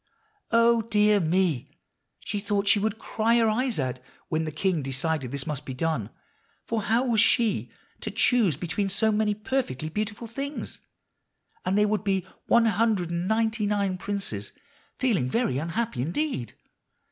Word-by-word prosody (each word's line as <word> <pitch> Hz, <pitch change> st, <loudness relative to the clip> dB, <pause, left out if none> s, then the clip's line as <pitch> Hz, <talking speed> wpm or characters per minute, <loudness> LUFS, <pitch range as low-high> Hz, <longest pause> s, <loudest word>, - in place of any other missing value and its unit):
Oh, 230 Hz, 0 st, +4 dB
dear 210 Hz, -2 st, +3 dB
me! 170 Hz, -5 st, 0 dB, 0.4 s
she 205 Hz, -, -3 dB
thought 200 Hz, 0 st, -1 dB
she 205 Hz, +1 st, +5 dB
would 220 Hz, +1 st, -1 dB
cry 230 Hz, +1 st, +1 dB
her 230 Hz, -1 st, +4 dB
eyes 240 Hz, +1 st, +1 dB
out 130 Hz, -3 st, -2 dB, 0.3 s
when 160 Hz, 0 st, 0 dB
the 155 Hz, -, -3 dB
king 170 Hz, +1 st, 0 dB
decided 135 Hz, 0 st, -1 dB
this 140 Hz, -1 st, -3 dB
must 150 Hz, -3 st, -4 dB
be 130 Hz, -, -6 dB
done; 135 Hz, -7 st, -1 dB, 0.6 s
for 230 Hz, -1 st, -1 dB
how 230 Hz, +5 st, +2 dB
was 230 Hz, -4 st, +3 dB
she 230 Hz, -2 st, +2 dB, 0.3 s
to -, -, -4 dB
choose 225 Hz, -, +3 dB
between 180 Hz, +6 st, -2 dB
so 220 Hz, +3 st, +2 dB
many 210 Hz, 0 st, +1 dB
perfectly 210 Hz, -, -2 dB
beautiful 210 Hz, +5 st, -3 dB
things, 275 Hz, +6 st, -5 dB, 0.9 s
and 185 Hz, +2 st, +1 dB
there 210 Hz, 0 st, +4 dB
would 210 Hz, -2 st, 0 dB
be 195 Hz, -3 st, 0 dB, 0.2 s
one 235 Hz, 0 st, +5 dB
hundred 215 Hz, -5 st, +1 dB
and 170 Hz, +1 st, -2 dB
ninety 220 Hz, 0 st, +1 dB
nine 200 Hz, -2 st, 0 dB
princes 190 Hz, -, -3 dB, 0.4 s
feeling 205 Hz, -, +1 dB
very 185 Hz, -, 0 dB
unhappy 165 Hz, -, -2 dB
indeed. 170 Hz, -, -2 dB
205 Hz, 160 wpm, -26 LUFS, 160-225 Hz, 0.9 s, she